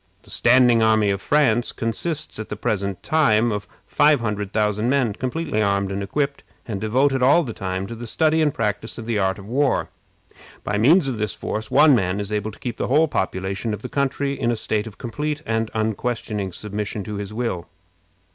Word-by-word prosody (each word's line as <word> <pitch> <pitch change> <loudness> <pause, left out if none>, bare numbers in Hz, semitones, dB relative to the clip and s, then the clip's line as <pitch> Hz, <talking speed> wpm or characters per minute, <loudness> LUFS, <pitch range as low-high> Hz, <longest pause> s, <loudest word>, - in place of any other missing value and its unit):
The - - -14
standing 120 -1 +5
army 110 -2 +3
of 100 0 -2
France 125 -5 +2
consists 150 +6 -3
at 110 - -6
the - - -3
present 100 -2 -2
time 120 -8 +3
of 105 -1 -4 0.2
five 150 -2 +4
hundred 105 -3 -3
thousand 105 +1 +1
men, 130 -6 +2
completely 130 -1 -2
armed 100 -1 +1
and 100 +1 -3
equipped, 140 +7 -2 0.2
and 100 -4 -4
devoted 130 +5 +2
all 145 +7 +5
the 120 -6 -5
time 95 -1 -3
to 115 - -7
the 115 +1 -7
study 160 +6 +2
and 150 -2 +3
practice 105 -2 -3
of 115 - -7
the 115 -2 0
art 95 -1 +1
of 100 - -10
war. 135 +5 +1 0.7
By 105 0 -1
means 150 - +5
of 125 -5 -3
this 105 -1 -1
force 110 +1 -4
one 150 +1 +6
man 95 -4 +1
is 100 +1 -3
able 105 0 -1
to 110 - -12
keep 120 -3 -5
the - - -2
whole 155 +5 +4
population 95 -2 -2
of 105 - -13
the - - -5
country 140 0 -1
in 130 -4 -1
a 120 - +1
state 110 0 -2
of 110 - -10
complete 150 +5 -4
and 110 0 -1
unquestioning 110 -2 -2
submission 105 +2 -4
to 105 +1 -5
his 100 0 -5
will. 110 -7 -3
110 Hz, 205 wpm, -22 LUFS, 105-135 Hz, 0.7 s, one